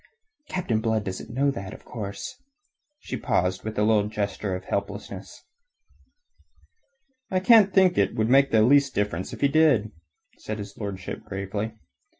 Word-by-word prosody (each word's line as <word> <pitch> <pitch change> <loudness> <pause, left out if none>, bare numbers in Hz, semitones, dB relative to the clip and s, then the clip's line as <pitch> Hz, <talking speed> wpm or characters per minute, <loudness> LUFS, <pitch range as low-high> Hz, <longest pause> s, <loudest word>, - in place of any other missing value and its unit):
Captain 120 -12 -1
Blood 110 -1 0
doesn't 95 -1 -6
know 140 +4 +1
that, 95 -7 -7
of - - -16
course...." 100 - -7 0.6
She - - -5
paused 90 +1 0
with 110 0 -5
a 105 - +2
little 105 -1 +3
gesture 100 -2 -3
of 95 0 -7
helplessness. 100 +2 -5 1.9
"I 185 - +1
can't 205 0 +6
think 190 -2 +5
that - - +2
it - - -13
would 110 0 +1
make 135 +3 +5
the 110 -1 +4
least 140 +2 +4
difference 100 -3 -1
if - - -9
he 140 - +5
did," 140 -8 +3 0.5
said 110 - -5
his 100 -1 -8
lordship 100 -5 -6
gravely. 100 +3 -4
110 Hz, 155 wpm, -25 LUFS, 100-140 Hz, 1.9 s, can't